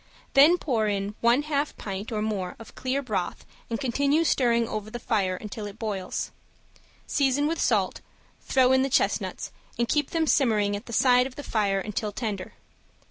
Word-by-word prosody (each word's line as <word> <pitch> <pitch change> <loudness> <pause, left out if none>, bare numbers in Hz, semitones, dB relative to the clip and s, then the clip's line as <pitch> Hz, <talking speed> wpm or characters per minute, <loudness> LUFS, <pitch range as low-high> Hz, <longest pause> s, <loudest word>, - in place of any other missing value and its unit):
Then 300 +6 +7
pour 235 -10 0
in 200 0 -1
one 235 +5 +4
half 295 -1 -1
pint 200 +3 -5
or 215 -1 -1
more 195 -4 -2
of 225 - -12
clear 265 +2 -2
broth 200 -8 -3 0.2
and 230 - -2
continue 280 +4 +2
stirring 235 -6 +2
over 215 -1 -4
the 240 - -5
fire 200 -6 0
until 210 +2 -6
it 205 +1 -10
boils. 205 -5 -3 0.7
Season 280 0 +1
with 325 +2 -1
salt, - - +1 0.4
throw 260 -1 +3
in 260 0 +5
the 270 - +1
chestnuts - - 0 0.3
and 235 - +1
keep 295 +1 +1
them 325 -1 +1
simmering 215 -9 +2
at 205 +4 -7
the - - -7
side 250 +2 +4
of 260 - -13
the 290 - -7
fire 205 -6 0
until 210 +1 -3
tender. 205 -4 -4
235 Hz, 180 wpm, -26 LUFS, 210-270 Hz, 0.7 s, Then